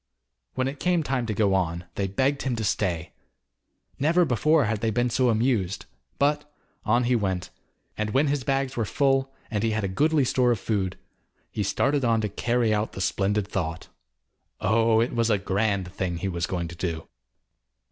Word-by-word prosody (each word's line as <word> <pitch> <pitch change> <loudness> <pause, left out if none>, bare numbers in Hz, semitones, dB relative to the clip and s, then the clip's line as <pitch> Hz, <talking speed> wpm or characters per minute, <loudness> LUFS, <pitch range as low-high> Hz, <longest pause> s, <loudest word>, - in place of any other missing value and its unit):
When 130 0 0
it 140 +1 -5
came 180 -2 +1
time 130 -5 -1
to 110 - -1
go 100 -1 +2
on, 85 -2 -1
they 100 - -1
begged 135 +8 0
him 130 -3 -1
to 110 - -3
stay. 90 -5 -1 0.9
Never 170 +5 +3
before 150 +3 +3
had 110 0 -1
they 115 - +1
been 120 +2 0
so 125 +1 +2
amused, 105 - 0 0.3
but 150 +1 +1 0.3
on 120 +3 +2
he 125 +1 +2
went, 95 -5 -2 0.5
and 105 0 0
when 135 +7 +2
his 140 -2 0
bags 135 0 -1
were 115 - 0
full, 135 +3 +1 0.2
and 105 -2 0
he 115 - +2
had 110 - -1
a - - 0
goodly 145 +9 +2
store 125 0 +2
of 115 - 0
food, 95 -3 -1 0.5
he - - -3
started 135 +8 +1
on 115 -2 +3
to 105 - -1
carry 115 +2 +1
out 105 +1 -1
the - - -7
splendid 100 +1 0
thought. 85 -6 -4 0.7
Oh, 115 +2 +3
it 120 - -1
was 115 -1 +1
a 105 - +3
grand 100 -1 -1
thing 90 -3 -2
he 90 - -3
was 85 -3 -2
going 85 -2 -2
to 85 - -9
do. 85 -2 -4
110 Hz, 190 wpm, -26 LUFS, 95-130 Hz, 0.9 s, Never